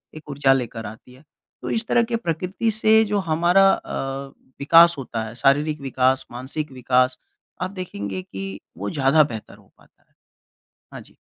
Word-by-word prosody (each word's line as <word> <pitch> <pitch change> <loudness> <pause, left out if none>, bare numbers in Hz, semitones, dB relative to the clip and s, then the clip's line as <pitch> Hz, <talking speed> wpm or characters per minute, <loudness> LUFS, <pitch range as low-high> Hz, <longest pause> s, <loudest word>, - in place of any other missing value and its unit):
एक 155 -1 -12
ऊर्जा 140 -1 +3
लेकर 120 -3 -4
आती 110 +4 -11
है। 130 +3 -19 0.4
तो - - -5
इस 225 0 -1
तरह 240 - +3
के - - +1
प्रकृति 190 +2 -2
से 220 0 +5
जो 205 - +2
हमारा 175 +4 +4
अ, 135 0 -5 0.3
विकास 170 +4 +6
होता 120 -4 -4
है, 110 +1 -8
शारीरिक 145 +4 +1
विकास, 130 -1 +1
मानसिक 135 +5 -6
विकास, 130 0 +1 0.4
आप 185 - -2
देखेंगे 100 - -6
कि 95 +1 -7 0.2
वो 100 +3 -4
ज़्यादा 140 +5 +3
बेहतर 115 -7 -7
हो - - -24
पाता - - -27
है। - - -42 0.8
हाँ - - -8
जी। - - -20
135 Hz, 170 wpm, -22 LUFS, 125-170 Hz, 0.8 s, विकास